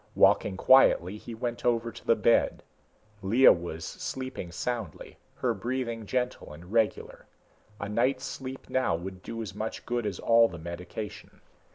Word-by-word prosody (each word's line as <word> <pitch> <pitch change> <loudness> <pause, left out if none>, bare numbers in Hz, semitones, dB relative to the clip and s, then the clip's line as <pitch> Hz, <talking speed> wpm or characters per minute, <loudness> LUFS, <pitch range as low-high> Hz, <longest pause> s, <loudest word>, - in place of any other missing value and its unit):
Walking 95 - +4
quietly, 105 -6 +5
he 115 - -8
went 120 +1 -4
over 115 -1 +1
to 115 - -14
the 115 - +5
bed. 115 +2 +2 0.6
Lea 115 +8 +6
was 85 -2 0
sleeping 130 -9 -5
soundly, 110 -3 -5 0.2
her 120 -2 0
breathing 115 0 -3
gentle 125 -6 -2
and 85 +6 -12
regular. 115 -2 0 0.5
A 100 - -4
night's 130 +5 0
sleep 130 0 -7
now 130 -10 +1
would 95 +2 -7
do 115 +2 -5
as 100 - -7
much 110 +2 -5
good 120 -2 -1
as 95 -4 -3
all 115 0 +5
the 85 - -9
medication. 85 +5 -7
115 Hz, 155 wpm, -28 LUFS, 95-120 Hz, 0.6 s, Lea